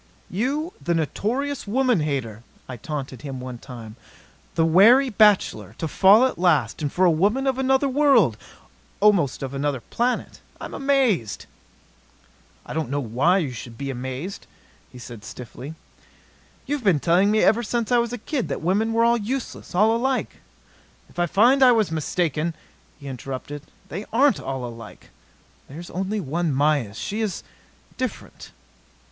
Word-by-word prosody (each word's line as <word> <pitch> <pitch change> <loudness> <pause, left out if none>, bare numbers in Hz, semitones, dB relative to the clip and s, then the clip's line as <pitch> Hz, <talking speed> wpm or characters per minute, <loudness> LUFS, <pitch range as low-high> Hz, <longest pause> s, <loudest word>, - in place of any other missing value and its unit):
"You, 280 - -2
the 170 - 0
notorious 240 - -2
woman 250 -1 +2
hater," 130 -8 -3 0.3
I 130 - -6
taunted 135 +1 -6
him 135 -3 -6
one 125 -1 -7
time, 115 -3 -10 0.6
"the 165 - +3
wary 230 +11 +6
bachelor 195 - +3
to 160 - -3
fall 200 - +5
at 260 - -2
last. 155 -9 +2
And 145 -2 -2
for 185 - +2
a 175 - +5
woman 205 - +1
of 265 -1 0
another 265 +1 +2
world 265 - +4 0.6
almost 195 - +3
of 135 0 -5
another 140 -1 -1
planet! 240 - -2 0.2
I'm - - -8
amazed!" 260 - 0 1.2
"I - - -7
don't 155 -5 -2
know 145 +2 -1
why 135 - +2
you 155 -9 -1
should 120 -1 -9
be 140 +1 -4
amazed," 130 +9 -6 0.5
said 120 -2 -9
he - - -22
stiffly. 130 +6 -9 0.9
"You've 285 -2 -3
been 185 -8 +3
telling 180 +6 +3
me 215 +1 +3
ever 225 +2 +4
since 235 0 -2
I 245 - +5
was 235 0 -1
a 245 - -4
kid 255 +2 -3
that - - -3
women 205 +7 0
were 230 0 +3
all 235 0 +4
useless, 240 -2 -5
all 215 +4 +4
alike 260 +2 -1 0.4
" - - -28
"I 175 0 0
find 240 - +4
I 255 -2 +7
was 215 -7 +1
mistaken," 160 0 -1 0.4
he 140 - -10
interrupted. 135 +2 -6 0.3
"They 195 +6 -5
aren't 265 -1 +3
all 135 -2 -4
alike. 115 -2 -11 0.6
There's 165 +6 -9
only 195 +4 -2
one 165 0 -1
Mayis. 140 -7 +1
She 215 +2 -3
is 205 -6 -3 0.5
different." 255 -2 -6
175 Hz, 160 wpm, -23 LUFS, -, 1.2 s, I